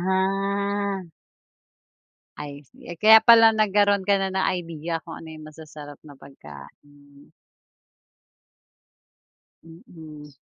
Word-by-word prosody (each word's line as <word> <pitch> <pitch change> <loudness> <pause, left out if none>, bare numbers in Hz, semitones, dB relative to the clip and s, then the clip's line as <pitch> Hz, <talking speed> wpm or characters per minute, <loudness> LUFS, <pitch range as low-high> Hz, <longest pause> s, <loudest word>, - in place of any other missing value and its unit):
Ah. 195 0 -3 1.3
Ay 145 -1 -9
sige. 175 - -12
Eh, - - -17
kaya 220 +1 +8
pala 225 0 +6
nagkaro'n 205 -2 0
ka 200 - +2
na 195 - -2
ng 190 0 -2 0.2
idea 165 0 -7
kung 165 - -11
ano - - -13
yung 155 0 -12
masasarap 150 -2 -13
na 145 - -14
pagkain. 140 - -17 2.3
Mm. 160 -3 -15
170 Hz, 105 wpm, -22 LUFS, 150-200 Hz, 2.3 s, kaya